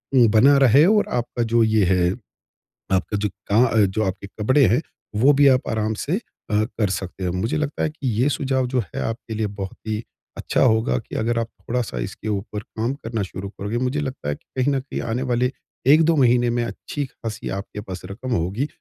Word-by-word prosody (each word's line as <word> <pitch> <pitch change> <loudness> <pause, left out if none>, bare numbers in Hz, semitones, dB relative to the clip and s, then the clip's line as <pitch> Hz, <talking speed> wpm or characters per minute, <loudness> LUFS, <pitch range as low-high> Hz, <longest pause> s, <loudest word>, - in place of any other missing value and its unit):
वो 120 -3 +7
बना 140 +4 +6
रहे 135 +5 +6
और 210 +1 +4
आपका 120 0 -2
जो 115 -1 +5
ये 110 -2 +3
है 90 -1 +3 0.8
आपका 95 +2 0
जो 105 0 -1 0.2
क 110 -2 +4
जो 110 - +1
आपके 95 +1 -4
कपडे 130 +8 +2
हैं, 120 +7 +3 0.3
वो 130 +7 +5
भी 140 0 +5
आप 130 -1 +3
आराम 110 0 0
से 140 +8 -3
अ, - - -1 0.3
कर 110 -1 +1
सकते 95 0 -4
हो। 90 - 0
मुझे 95 +9 -1
लगता 150 -1 -2
है - - +1
कि 150 -3 -6
ये 140 - +3
सुझाव 130 -3 0
जो 125 0 0
है 90 -8 -6
आपके 115 0 -4
लिए 110 -1 0
बहुत 95 -1 -5
ही 110 0 -1 0.4
अच्छा - - 0
होगा 110 -3 +3
कि - - -10
अगर 115 +1 0
आप 115 - -1
थोड़ा-सा 120 - -2
इसके 95 - -5
ऊपर 105 0 -3
काम 115 +5 -3
करना 115 -5 -4
शुरू 95 +1 -6
करोगे, 100 +3 -4
मुझे 130 +4 0
लगता 135 - -4
है 75 - -1
कि - - -25 0.2
कहीं 140 +2 +2
न 135 - +1
कहीं 130 - -5
आने 115 +3 -2
वाले 125 +1 +2 0.4
1-2 165 +1 +5
महीने 120 -3 +4
में 120 0 0
अच्छी-ख़ासी 115 -3 -5
आपके 100 +1 -5
पास 95 -4 -7
रक़म 110 +7 -6
होगी, 105 - 0
115 Hz, 205 wpm, -22 LUFS, 105-130 Hz, 0.8 s, वो